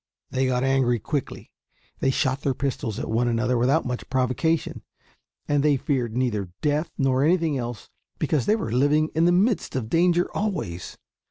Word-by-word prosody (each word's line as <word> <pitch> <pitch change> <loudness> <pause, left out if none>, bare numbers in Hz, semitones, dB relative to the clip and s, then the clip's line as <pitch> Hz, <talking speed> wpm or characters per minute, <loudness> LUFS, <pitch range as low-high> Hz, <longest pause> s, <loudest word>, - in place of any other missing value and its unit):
They 130 0 +1
got 125 0 0
angry 135 -2 +2
quickly; 135 +5 -4 0.5
they 135 - +1
shot 135 0 0
their 135 -2 0
pistols 120 -6 -3
at - - -4
one 115 +2 +1
another 120 +2 +1
without 130 +7 +2
much 125 -1 -4
provocation, 130 +5 0 0.7
and 145 -1 +2
they 145 -1 +3
feared 125 -4 -1
neither 105 -7 -1
death 150 +2 +1
nor 135 -1 +2
anything 165 -1 +2
else 120 -3 -5 0.3
because 150 -5 0
they 215 - +4
were 165 - -3
living 145 +5 +2
in 160 +1 +2
the 175 - +5
midst 200 - +1
of 115 -4 -2
danger 175 +2 +3
always. 175 - -3
135 Hz, 170 wpm, -24 LUFS, 125-155 Hz, 0.7 s, the